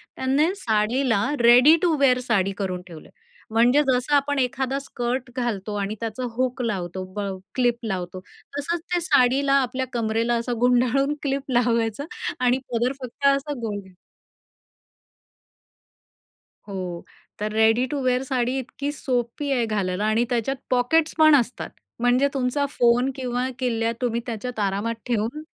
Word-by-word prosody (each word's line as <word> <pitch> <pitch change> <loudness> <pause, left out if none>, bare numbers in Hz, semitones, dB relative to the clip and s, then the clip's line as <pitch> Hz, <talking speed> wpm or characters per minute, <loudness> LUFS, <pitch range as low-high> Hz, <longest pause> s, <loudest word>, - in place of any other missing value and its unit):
त्यांनी 275 +5 +2
साडीला 230 - +1 0.2
ready 245 +6 +7
to 340 -3 +3
wear 255 -3 +4
sari 195 -3 +2
करून 185 -3 -3
ठेवलंय. 165 -3 -12 0.4
म्हणजे 240 +6 +4
जसं 255 +3 +1
आपण 285 0 +1
एखादा 260 +2 -1
स्कर्ट 250 -1 -3
घालतो 220 -5 -2
आणि 200 +1 -2
त्याचा 230 +2 -4
हूक 255 +1 -1
लावतो 185 -5 -3
ब - - -3 0.4
क्लिप 245 -2 +2
लावतो 185 -3 -4 0.4
तसंच 335 +4 -2
त्या 355 -1 +1
साडीला 275 -3 +3
आपल्या 260 +1 -2
कंबरेला 230 0 0
असं 235 0 -3
गुंडाळून 250 +4 +2
क्लिप 275 -1 -2
लावायचं 235 +1 +1 0.3
आणि 250 0 +3
पदर 240 +2 +1
फक्त 255 +3 -6
असा 285 +2 -4
गोल. 210 -3 -3 2.9
हो 180 -3 -5 0.3
तर 210 +1 -3
रेडी 220 +3 +3
टू 290 - -1
वेअर 255 0 +1
साडी 255 -1 -1
इतकी 275 +2 -4
सोपी 255 0 -2
आहे 245 -3 +2
घालायला 200 -2 -1
आणि 220 +2 +2
त्याच्यात 245 +3 0
पॉकेट्स 260 +6 +2
पण 310 -1 +7
असतात. 250 -3 0 0.3
म्हणजे 245 +3 +3
तुमचा 270 +2 0
फोन 245 0 +3
किंवा 250 -1 -2
किल्ल्या 230 -3 0
तुम्ही 235 -1 0
त्याच्यात 240 +1 -5
आरामात 205 +3 -1
ठेऊन 240 +5 -1
245 Hz, 140 wpm, -24 LUFS, 225-270 Hz, 2.9 s, रेडी